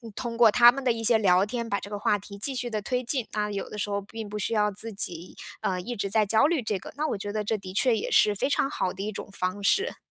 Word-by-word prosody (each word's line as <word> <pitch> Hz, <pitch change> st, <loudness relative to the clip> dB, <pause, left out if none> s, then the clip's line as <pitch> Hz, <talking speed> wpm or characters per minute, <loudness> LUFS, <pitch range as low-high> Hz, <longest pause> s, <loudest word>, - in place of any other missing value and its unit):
通 235 Hz, -2 st, -4 dB
过 230 Hz, -2 st, +6 dB
他 240 Hz, +2 st, +8 dB
们 275 Hz, +2 st, -6 dB
的 255 Hz, -, +3 dB
一 230 Hz, -1 st, -3 dB
些 230 Hz, 0 st, +5 dB
聊 185 Hz, -3 st, +4 dB
天， 235 Hz, +2 st, -4 dB
把 200 Hz, -2 st, -1 dB
这 -, -, -9 dB
个 205 Hz, -, -4 dB
话 205 Hz, 0 st, +1 dB
题 200 Hz, +1 st, -11 dB
继 270 Hz, +7 st, -2 dB
续 250 Hz, -1 st, -3 dB
地 215 Hz, -2 st, -2 dB
推 250 Hz, +3 st, -1 dB
进。 250 Hz, -1 st, -1 dB
啊， 210 Hz, -1 st, -1 dB
有 200 Hz, -1 st, -4 dB
的 210 Hz, -, -8 dB
时 205 Hz, -, -2 dB
候 200 Hz, 0 st, -1 dB
并 215 Hz, +1 st, -8 dB
不 210 Hz, -, -5 dB
需 210 Hz, +2 st, -1 dB
要 210 Hz, -1 st, +2 dB
自 220 Hz, +3 st, -6 dB
己， 175 Hz, -3 st, -5 dB, 0.3 s
呃， 185 Hz, -1 st, -1 dB
一 240 Hz, +6 st, -5 dB
直 200 Hz, -2 st, -2 dB
在 215 Hz, +2 st, +3 dB
焦 220 Hz, +4 st, +3 dB
虑 315 Hz, -2 st, +1 dB
这 215 Hz, -3 st, -2 dB
个， -, -, -10 dB
那 305 Hz, +2 st, -1 dB
我 220 Hz, -, -2 dB
觉 205 Hz, +1 st, -5 dB
得 215 Hz, -1 st, -1 dB
这 215 Hz, +1 st, -1 dB
的 185 Hz, -2 st, -9 dB
确 230 Hz, +3 st, +3 dB
也 -, -, -4 dB
是 210 Hz, -1 st, +5 dB
非 195 Hz, -, 0 dB
常 275 Hz, -1 st, +1 dB
好 185 Hz, -9 st, -2 dB
的 190 Hz, -, -8 dB
一 215 Hz, -, -3 dB
种 205 Hz, -, -7 dB
方 190 Hz, +1 st, -3 dB
式。 395 Hz, -, +2 dB
215 Hz, 325 characters per minute, -26 LUFS, 200-240 Hz, 0.3 s, 他